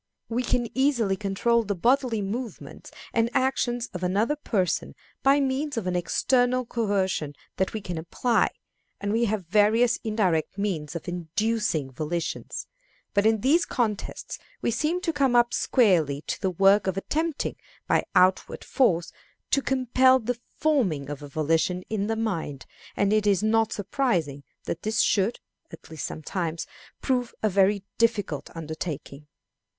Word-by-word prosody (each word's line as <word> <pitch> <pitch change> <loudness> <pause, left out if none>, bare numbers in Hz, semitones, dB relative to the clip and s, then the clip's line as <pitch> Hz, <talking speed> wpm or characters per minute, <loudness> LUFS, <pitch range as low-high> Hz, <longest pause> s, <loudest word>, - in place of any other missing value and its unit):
We 235 +2 0
can 240 -1 0
easily 250 -7 +2
control 210 +4 +1
the 205 -2 -2
bodily 240 +1 +2
movements 225 +4 -6 0.2
and 230 0 +2
actions 245 -2 +1
of 180 - -5
another 205 +10 +1
person 205 - -1 0.3
by 275 +1 +4
means 275 +1 -1
of 225 - -2
an 180 -1 -1
external 250 +7 +1
coercion 195 -10 -1 0.2
that 190 - 0
we 220 - -3
can 175 -4 -4
apply, 230 +9 +1 0.5
and 200 +1 -2
we 235 +1 +2
have 210 -4 -2
various 220 +6 +3
indirect 195 -7 0
means 170 -7 -2
of 170 - -6
inducing 175 -3 -1
volitions; 160 +5 -4 0.5
but 205 +1 +3
in 220 -2 +2
these 310 +8 +4
contests 220 -5 -3 0.2
we - - 0
seem 310 +9 0
to 340 -4 -1
come 270 -4 +2
up 240 0 +4
squarely 165 - +2
to - - -5
the 190 - +1
work 195 +3 +4
of 190 0 -1
attempting, 315 +9 -2 0.3
by - - +2
outward 185 +1 +3
force, 175 -10 +1 0.4
to 275 - +3
compel 260 0 +4
the 245 0 -3 0.2
forming 190 - +1
of 145 - -6
a 145 - -8
volition 160 +5 0
in 205 -2 -1
the 225 - 0
mind; 170 -11 -3 0.3
and 200 +1 +2
it 215 -1 +2
is 200 0 +3
not 220 0 +2
surprising 190 - -1 0.2
that 170 - -4
this 215 +1 +1
should, 205 +3 +1 0.3
at - - -13
least 160 - -4
sometimes, 165 +1 -4 0.4
prove 250 -3 -1
a 215 - +3
very 195 +1 +3 0.2
difficult 210 -10 0
undertaking. 155 -2 -6
210 Hz, 150 wpm, -26 LUFS, 180-240 Hz, 0.5 s, by